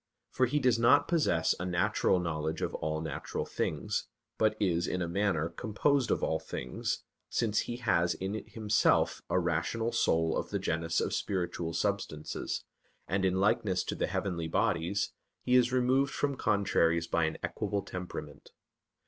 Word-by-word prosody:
For 130 - +2
he 145 +5 0
does 125 -5 +3
not 130 +5 +5
possess 85 - +2
a - - -3
natural 90 +1 +2
knowledge 80 -2 -2
of - - -2
all 80 0 -2
natural 80 - -4
things, - - -2 0.3
but 110 0 +3
is 85 -4 +1
in 90 - -1
a 85 - -1
manner 85 -3 0
composed 125 - 0
of - - +1
all 80 - +1
things, - - -4 0.3
since 110 -3 +1
he 120 - -3
has 90 -7 +2
in 95 +2 -3
himself 105 -1 +2
a - - +2
rational 90 +7 0
soul 80 -5 +2
of - - -2
the - - -1
genus 80 +1 0
of - - -1
spiritual 85 -3 -2
substances, 95 -7 -2 0.4
and 95 +2 0
in 95 -1 +2
likeness 95 -2 +2
to - - -3
the - - -1
heavenly 90 -3 -2
bodies 95 +1 0 0.3
he 125 - 0
is 125 -1 +5
removed 130 +2 +2
from 140 -1 0
contraries 85 -7 +2
by 85 0 +1
an 80 - -2
equable 100 -1 -2
temperament. 90 -1 -7
95 Hz, 160 wpm, -31 LUFS, 85-115 Hz, 0.4 s, not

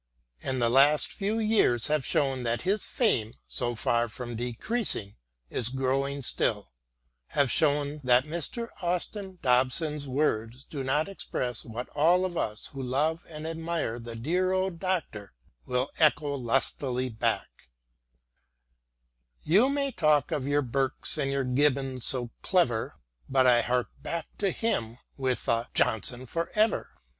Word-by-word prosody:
And 130 -1 -2
the 120 - +3
last 140 +5 +4
few 210 +2 -1
years 215 - +3
have 150 -2 +1
shown 135 -1 +1
that 120 -1 -1
his 195 +3 +1
fame, 120 - +1
so 120 0 -2
far 120 +1 +1
from 120 +1 -6
decreasing, 120 - 0 0.3
is 120 -1 0
growing 135 +2 -1
still 105 - 0 0.3
— - - -24
^have 140 -3 +3
shown 145 -1 +1
that 125 0 +5
Mr. 170 +9 -3
Austin 185 +2 -2
Dobson's 140 +4 +2
words 125 -3 -1
do 140 -2 -6
but 145 +5 +1
express 125 - -4
what 115 +2 -6
all 175 +5 +3
of 180 -2 -4
us 105 -8 -2
who 135 - -5
love 150 +6 0
and 155 -1 -7
admire 165 -7 -2
the 115 0 -7
dear 175 +10 0
old 185 -2 -1
Doctor 165 - -3 0.3
will 125 +2 -1
echo 150 -2 +3
lustily 130 0 0
back: 110 - -2 1.7
You 205 - +4
may 280 -1 0
talk 150 - +2
of 135 -2 -1
your 145 0 +2
Burkes 135 +4 -1
and 135 -2 0
your 140 0 0
Gibbons 130 -1 +1
so 120 -3 0
clever, 125 -12 +1 0.3
But 130 -1 +4
I 120 -1 +6
hark 125 0 0
back 170 -1 -5
to 200 - +2
him 120 - -2 0.2
with 130 -2 -2
a 115 0 +1
"Johnson 120 +4 +1
for 165 +6 -3
ever 215 +1 +2
135 Hz, 145 wpm, -28 LUFS, 120-165 Hz, 1.7 s, I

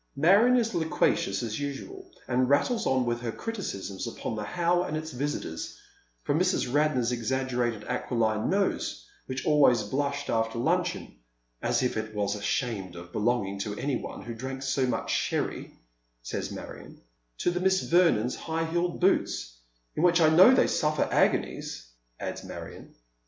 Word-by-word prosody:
Marion 200 - +5
is 230 -1 +1
loquacious 160 -10 +1
as 110 0 -3
usual, 365 - -6 0.2
and 125 0 +1
rattles 220 - +2
on 130 -1 +2
with 120 0 -1
her 120 -2 -2
criticisms 115 - -5
upon 115 0 -4
the 105 - -4
How 175 +8 +1
and 155 -3 -2
its 155 0 -5
visitors, 130 - -4 0.5
from 145 +2 +1
Mrs. 180 -8 +1
Radnor's 145 -5 +2
exaggerated 120 -2 -1
aquiline 110 -3 0
nose, 195 +1 0 0.2
which 130 0 -4
always 145 -5 +5
blushed 140 +1 -2
after 115 0 0
luncheon, 90 - -1 0.2
" - - -46
as - - +2
if 125 - 0
it 110 0 -4
was 100 -1 0
ashamed 100 -3 -2
of 85 0 -10
belonging 105 -3 0
to 105 +1 -3
any 140 -1 -1
one - - -7
who 120 - -6
drank 130 +3 -6
so 135 -1 +1
much 125 - -2
sherry," - - -1 0.5
says - - -4
Marion, - - -9 0.4
to 175 - +1
the 180 - -2
Miss 190 0 +2
Vernons' 165 -9 +3
high 165 0 -2
heeled 175 +1 -1
boots, 175 - +1 0.4
"in - - -1
which 175 0 +4
I 160 -2 +6
know 180 +9 +8
they 260 - +5
suffer 150 0 +1
agonies," - - 0 0.3
adds - - -5
Marion. - - -9
130 Hz, 160 wpm, -28 LUFS, 115-165 Hz, 0.5 s, know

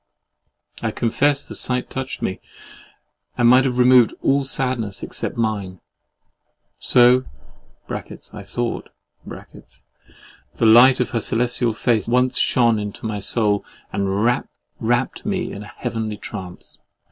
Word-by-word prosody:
I - - -1
confess 135 +5 0
the - - -8
sight 125 -1 -2
touched 130 0 -5
me; 95 - -2 1.0
and 120 - +4
might 130 +2 +6
have 125 -2 -1
removed 125 -2 +5
all 140 +1 +2
sadness 125 -6 -2
except - - -4
mine. 100 -5 -2 1.0
So 125 +1 +5 0.6
(I 105 - -8
thought) 115 +4 -4 0.3
the - - -10
light 125 +4 +7
of 125 - -2
her 115 - -1
celestial 120 0 +1
face 110 -1 0
once 125 +2 +1
shone 115 -3 +3
into 105 +1 -6
my 105 -2 -3
soul, 105 0 +1 0.3
and 100 +2 0
wrapt 120 0 -2
me 195 -3 -2
in 100 - -7
a 105 - -10
heavenly 110 -2 -4
trance. 95 -4 -9
120 Hz, 125 wpm, -21 LUFS, 105-125 Hz, 1.0 s, light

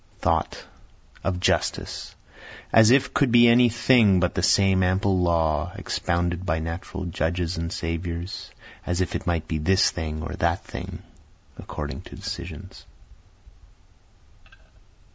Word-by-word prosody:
Thought - - -1 0.6
Of 90 -2 -1
justice 90 - -1 0.6
as 110 -1 +7
If 130 +2 +3
could 140 -4 +2
be 120 0 +7
any 120 +1 +6
thing 115 -4 +4
but 90 0 0
the - - -1
same 95 -1 +3
ample 95 +1 +1
law, 85 -1 +1
expounded 85 +1 -2
by 80 -3 0
natural 85 +3 -5
judges 85 +1 -2
and 85 0 -3
saviors, 85 +1 -4 0.3
As 90 0 -2
if 90 - -1
it 95 - -4
might 85 -2 -1
be 80 -3 -2
this 95 +5 +3
thing 80 -2 -5
or - - -5
that - - 0
thing, - - -8 0.6
according - - -6
to - - -12
decisions. - - -8
90 Hz, 130 wpm, -24 LUFS, 85-95 Hz, 0.6 s, as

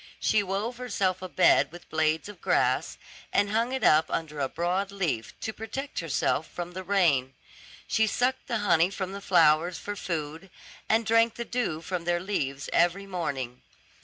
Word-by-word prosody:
She 215 - +3
wove 205 +5 -3
herself 195 -7 -1
a 185 - -6
bed 180 - +4
with 175 +1 -12
blades 160 +1 +1
of 205 - -11
grass, - - +1 0.3
and 205 0 +2
hung 230 +3 +1
it 265 -3 -2
up 155 +1 +5
under 150 -2 -3
a 135 -1 0
broad 180 +4 -1
leaf, 170 - -3
to 220 - -3
protect 265 +6 -5
herself 160 -1 0
from 175 0 -6
the 185 +1 -6
rain. 165 -9 +2 0.5
She 220 0 +2
sucked 250 +4 0
the 235 - 0
honey 170 -2 +4
from 190 -1 -4
the 200 +1 -7
flowers 165 -2 +4
for 205 +5 -5
food, 165 0 -4 0.4
and 225 +1 +3
drank 230 +1 +3
the 235 - -4
dew 225 -12 -2
from 175 0 -4
their 175 0 +1
leaves 140 -8 -3
every 175 +3 +2
morning. 140 -10 -4
185 Hz, 175 wpm, -27 LUFS, 160-205 Hz, 0.5 s, up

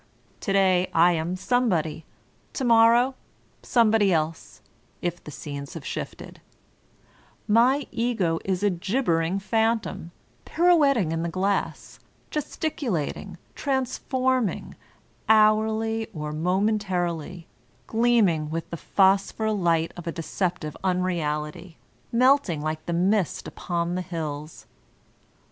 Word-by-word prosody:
To - - -3
day 185 -2 +3
I 170 +2 +6
am 170 +2 -1
somebody, 180 -8 0 0.5
to 270 - -3
morrow 235 +2 +5 0.5
somebody 220 -4 +3
else, 160 -1 -2 0.4
if 175 0 -4
the - - -9
scenes 140 -1 -7
have - - -8
shifted; - - -7 1.1
my 250 +6 +4
Ego 220 -9 0
is 190 0 -2
a 205 - +3
gibbering 180 -2 0
phantom, 220 -3 -1 0.3
pirouet 330 -5 +4
ting 185 -9 0
in 165 0 -1
the 170 - -2
glass, 195 +4 -2 0.3
gesticulating, 240 - -3 0.2
transforming, 260 -3 -1 0.6
hourly 220 +1 +3
or 150 -1 -4
momentarily, 180 -1 -1 0.4
gleaming 220 -10 +2
with 165 +1 -4
the 170 - -4
phosphor 200 +5 +2
light 170 -5 +1
of 175 -1 -9
a - - 0
deceptive 170 -1 -3
unreality, 170 -2 -2 0.3
melting 250 - +3
like 155 +2 -4
the 170 - -1
mist 185 +2 0
upon 170 -1 -3
the 185 - -1
hills. 155 -3 -6
185 Hz, 110 wpm, -25 LUFS, 165-225 Hz, 1.1 s, I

